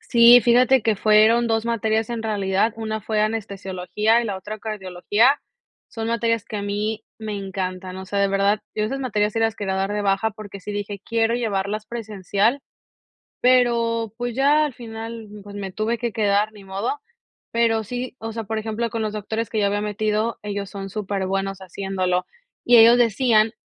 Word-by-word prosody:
Sí, 240 Hz, 0 st, +7 dB
fíjate 250 Hz, +2 st, +4 dB
que 220 Hz, -1 st, +1 dB
fueron 220 Hz, +3 st, +4 dB
2 225 Hz, -1 st, 0 dB
materias, 220 Hz, -1 st, 0 dB
en 235 Hz, -1 st, -3 dB
realidad. 205 Hz, 0 st, +1 dB
Una 220 Hz, -1 st, -3 dB
fue 215 Hz, 0 st, -1 dB
anestesiología 210 Hz, +1 st, 0 dB
y -, -, -4 dB
la 205 Hz, -4 st, -3 dB
otra 210 Hz, +3 st, -7 dB
cardiología. 210 Hz, +5 st, +1 dB, 0.5 s
Son 225 Hz, 0 st, -4 dB
materias 230 Hz, -1 st, 0 dB
que 220 Hz, -, -6 dB
a 205 Hz, -, -3 dB
mí 210 Hz, +2 st, -2 dB
me 215 Hz, -2 st, -4 dB
encantan, 185 Hz, -1 st, -5 dB
o 190 Hz, -, -7 dB
sea, 200 Hz, -, -2 dB
de 200 Hz, -, +3 dB
verdad, 200 Hz, +2 st, +2 dB
yo 215 Hz, -, 0 dB
esas 270 Hz, +5 st, -3 dB
materias 210 Hz, -5 st, 0 dB
sí 225 Hz, -, -2 dB
las 225 Hz, -1 st, +1 dB
quería 195 Hz, -2 st, -2 dB
dar 195 Hz, +2 st, -1 dB
de 210 Hz, -, -1 dB
baja, 200 Hz, +2 st, +1 dB
porque 205 Hz, -1 st, -10 dB
sí 205 Hz, -, -7 dB
dije: 205 Hz, -1 st, -4 dB
"Quiero 230 Hz, 0 st, +1 dB
llevarlas 210 Hz, -2 st, -2 dB
presencial", 215 Hz, +2 st, -1 dB, 0.8 s
pero, 235 Hz, -3 st, +2 dB
pues, 245 Hz, -1 st, -3 dB
ya 285 Hz, +4 st, +4 dB
al 285 Hz, -, -7 dB
final, 225 Hz, -1 st, -7 dB, 0.2 s
pues, 205 Hz, 0 st, -10 dB
me 195 Hz, -2 st, -5 dB
tuve 215 Hz, +4 st, -1 dB
que 235 Hz, -1 st, -2 dB
quedar, 210 Hz, -1 st, +1 dB
ni 205 Hz, -2 st, -14 dB
modo. 200 Hz, -, -3 dB, 0.5 s
Pero 230 Hz, -1 st, +2 dB
sí 245 Hz, +4 st, -5 dB
o 225 Hz, 0 st, -5 dB
sea, 225 Hz, 0 st, -5 dB
por 220 Hz, +2 st, -3 dB
ejemplo, 220 Hz, +2 st, -2 dB
con 230 Hz, -, -3 dB
los 215 Hz, -1 st, -3 dB
doctores 220 Hz, +2 st, -3 dB
que 220 Hz, -, -2 dB
yo 205 Hz, -, +3 dB
había 205 Hz, +1 st, 0 dB
metido, 215 Hz, +2 st, -1 dB
ellos 200 Hz, -1 st, -4 dB
son 195 Hz, -1 st, -7 dB
superbuenos 195 Hz, -1 st, -2 dB
haciéndolo, 185 Hz, -1 st, -2 dB, 0.4 s
y 240 Hz, -, +6 dB
ellos 230 Hz, +2 st, +8 dB
decían 225 Hz, -1 st, +3 dB
215 Hz, 185 wpm, -22 LUFS, 200-230 Hz, 0.8 s, ellos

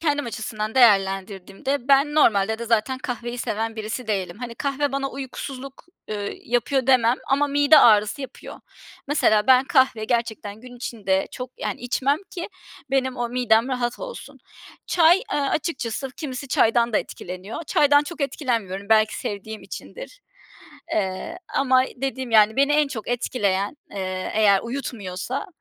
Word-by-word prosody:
kendim 290 Hz, -4 st, 0 dB
açısından 215 Hz, -1 st, -4 dB
değerlendirdiğimde 195 Hz, +3 st, +2 dB
ben 280 Hz, +2 st, +4 dB
normalde 220 Hz, -7 st, +3 dB
de 235 Hz, -, -4 dB
zaten 230 Hz, +3 st, +1 dB
kahveyi 240 Hz, -1 st, -5 dB
seven 225 Hz, -1 st, -3 dB
birisi 220 Hz, +3 st, -5 dB
değilim. 195 Hz, -3 st, -2 dB
Hani, 240 Hz, -1 st, -6 dB
kahve 280 Hz, +1 st, -1 dB
bana 275 Hz, 0 st, -2 dB
uykusuzluk, 270 Hz, 0 st, -7 dB, 0.2 s
eee, 205 Hz, -1 st, -4 dB
yapıyor 250 Hz, +2 st, 0 dB
demem 250 Hz, -2 st, +4 dB
ama 280 Hz, +2 st, +2 dB
mide 290 Hz, +2 st, +5 dB
ağrısı 210 Hz, +2 st, +5 dB
yapıyor. 265 Hz, -2 st, -9 dB, 0.5 s
Mesela 220 Hz, -8 st, +2 dB
ben 260 Hz, 0 st, +6 dB
kahveyi 260 Hz, -5 st, +2 dB
gerçekten 220 Hz, -3 st, -2 dB
gün 250 Hz, 0 st, -12 dB
içinde 200 Hz, -6 st, -1 dB
çok, 250 Hz, 0 st, -6 dB
yani, -, -, -4 dB
içmem 260 Hz, +4 st, 0 dB
ki 345 Hz, +1 st, -6 dB, 0.4 s
benim 260 Hz, -1 st, 0 dB
o 240 Hz, 0 st, -2 dB
midem 240 Hz, -1 st, +2 dB
rahat 245 Hz, -2 st, -2 dB
olsun. -, -, -9 dB, 0.5 s
Çay, 340 Hz, +1 st, +5 dB
eee, 450 Hz, -, -3 dB
açıkçası 275 Hz, -3 st, -2 dB
kimisi 275 Hz, -3 st, -6 dB
çaydan 235 Hz, -1 st, +3 dB
da -, -, +4 dB
etkileniyor. 185 Hz, -, -7 dB
Çaydan 290 Hz, 0 st, +4 dB
çok 330 Hz, +2 st, -9 dB
etkilenmiyorum. 230 Hz, -9 st, -2 dB
Belki 220 Hz, -1 st, +4 dB
sevdiğim 210 Hz, +2 st, -6 dB
içindir. -, -, -10 dB, 0.7 s
Eee, 190 Hz, -2 st, -2 dB, 0.2 s
ama 260 Hz, -1 st, +4 dB
dediğim, 260 Hz, -1 st, -3 dB
yani, 220 Hz, +1 st, +5 dB
beni 280 Hz, +1 st, +3 dB
en 300 Hz, -1 st, +3 dB
çok 225 Hz, -6 st, -6 dB
etkileyen, 205 Hz, -3 st, -1 dB
eee, 185 Hz, -1 st, -4 dB
eğer 205 Hz, -2 st, +4 dB
uyutmuyorsa, 235 Hz, -3 st, -5 dB
245 Hz, 145 wpm, -23 LUFS, 215-275 Hz, 0.7 s, ben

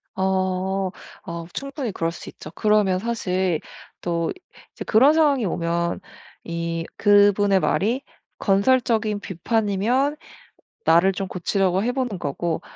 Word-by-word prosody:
어. 190 Hz, 0 st, 0 dB, 0.3 s
어 170 Hz, -2 st, -6 dB
충분히 275 Hz, -3 st, -4 dB
그럴 165 Hz, -3 st, -2 dB
수 -, -, -9 dB
있죠. 155 Hz, -, -11 dB
그러면 210 Hz, -3 st, +2 dB
사실 185 Hz, -7 st, -1 dB, 0.4 s
또 170 Hz, -1 st, -1 dB, 0.4 s
이제 -, -, -7 dB
그런 260 Hz, +7 st, +5 dB
상황이 290 Hz, -7 st, +3 dB
오면 170 Hz, 0 st, -1 dB, 0.4 s
이 170 Hz, 0 st, -3 dB
그분의 205 Hz, -1 st, +4 dB
말이 230 Hz, +9 st, +1 dB, 0.4 s
건설적인 220 Hz, 0 st, +2 dB
비판이면 220 Hz, -, 0 dB, 0.7 s
나를 180 Hz, +4 st, +5 dB
좀 195 Hz, +1 st, -4 dB
고치려고 190 Hz, +1 st, 0 dB
해 245 Hz, -, +1 dB
보는 250 Hz, -7 st, -2 dB
거고 160 Hz, +3 st, -2 dB
195 Hz, 240 characters per minute, -23 LUFS, 175-225 Hz, 0.7 s, 그런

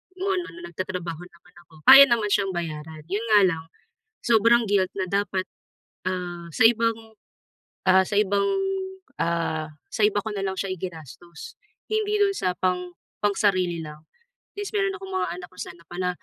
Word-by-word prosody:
na 370 Hz, -, -6 dB
mo 390 Hz, -, +1 dB
ano 355 Hz, -1 st, -3 dB
na 345 Hz, 0 st, -9 dB
nagtatrabaho 175 Hz, -3 st, -5 dB
naman 175 Hz, 0 st, -18 dB
ako, 160 Hz, -, -24 dB
kaya 270 Hz, +1 st, +12 dB
naman 230 Hz, -3 st, +2 dB
siyang 200 Hz, -2 st, +2 dB
bayaran, 155 Hz, -2 st, -5 dB
'yon 205 Hz, +4 st, -1 dB
nga 205 Hz, -1 st, +7 dB
lang, 160 Hz, -2 st, -2 dB, 0.6 s
sobrang 235 Hz, +1 st, +5 dB
guilt 190 Hz, -2 st, +2 dB
na 185 Hz, -, -1 dB
dapat, 200 Hz, -1 st, 0 dB, 0.7 s
ah, 175 Hz, -2 st, -4 dB
sa -, -, +3 dB
ibang, 230 Hz, 0 st, +2 dB, 0.9 s
ah, 190 Hz, 0 st, +6 dB
sa -, -, -6 dB
ibang, 200 Hz, -1 st, +2 dB, 0.8 s
ah, 165 Hz, -2 st, -1 dB, 0.2 s
sa 220 Hz, -, -3 dB
iba 205 Hz, -1 st, +2 dB
ko 220 Hz, -, -5 dB
na 195 Hz, -, -3 dB
lang 190 Hz, 0 st, -3 dB
siya 195 Hz, -, -2 dB
i-ginastos 175 Hz, -, -9 dB, 0.3 s
hindi 425 Hz, -1 st, 0 dB
dun 400 Hz, -1 st, +3 dB
sa 185 Hz, -1 st, 0 dB
pang 180 Hz, -1 st, -1 dB, 0.3 s
pang-sarili 185 Hz, -5 st, +1 dB
lang. 150 Hz, 0 st, -10 dB, 0.5 s
At -, -, -75 dB
least 405 Hz, -, -7 dB
meron 390 Hz, -1 st, +1 dB
akong 385 Hz, 0 st, -9 dB
mga 375 Hz, -, 0 dB
anak 180 Hz, 0 st, -9 dB
na 180 Hz, -, -16 dB
sana 175 Hz, -, -8 dB
na -, -, -23 dB
pala, 180 Hz, +1 st, -2 dB
190 Hz, 180 wpm, -25 LUFS, 175-230 Hz, 0.9 s, kaya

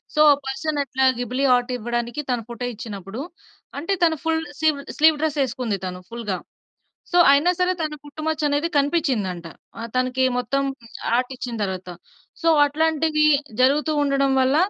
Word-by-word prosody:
So, 305 Hz, -, +4 dB
ఆహ్, 280 Hz, -, +3 dB
person 290 Hz, +3 st, -2 dB
అట్లా 265 Hz, -1 st, 0 dB
Ghibli 250 Hz, +3 st, -2 dB
art 245 Hz, 0 st, -1 dB
ఇవ్వడానికి 240 Hz, +4 st, -3 dB
తన 245 Hz, -1 st, +1 dB
ఫోటో 240 Hz, +1 st, -5 dB
ఇచ్చినప్పుడు, 210 Hz, 0 st, -7 dB, 0.6 s
అంటే 330 Hz, +7 st, -1 dB
తను 325 Hz, -1 st, +4 dB
ఫుల్ 325 Hz, 0 st, +1 dB, 0.6 s
స్లీవ్ 315 Hz, 0 st, +5 dB
డ్రెస్ 315 Hz, -2 st, 0 dB
వేసుకుంది, 245 Hz, -5 st, -1 dB
తను 180 Hz, 0 st, -5 dB
ఫుల్‌గా. 230 Hz, -5 st, -3 dB, 0.8 s
సో 355 Hz, -, +4 dB
అయినా 290 Hz, +5 st, +4 dB
సరే, 365 Hz, 0 st, +3 dB
తన 310 Hz, -1 st, -2 dB
పుట్టుమచ్చ 310 Hz, +1 st, -3 dB
అనేది 290 Hz, +3 st, 0 dB
కనిపించిందంట. 255 Hz, -, 0 dB, 0.3 s
ఆహ్, 230 Hz, -, -5 dB
తనకి 255 Hz, +1 st, +1 dB
మొత్తం 275 Hz, +2 st, 0 dB, 0.5 s
ఆర్ట్ 250 Hz, +1 st, -1 dB
ఇచ్చిన 245 Hz, -1 st, -5 dB
తర్వాత. 185 Hz, -1 st, -5 dB, 0.5 s
సో, 330 Hz, -, +2 dB, 0.2 s
అట్లాంటివి 310 Hz, +1 st, +1 dB, 0.3 s
జరుగుతూ 290 Hz, +5 st, +3 dB
ఉండడం 275 Hz, -1 st, +2 dB
వల్ల, 260 Hz, +3 st, +3 dB
270 Hz, 145 wpm, -22 LUFS, 240-305 Hz, 0.8 s, స్లీవ్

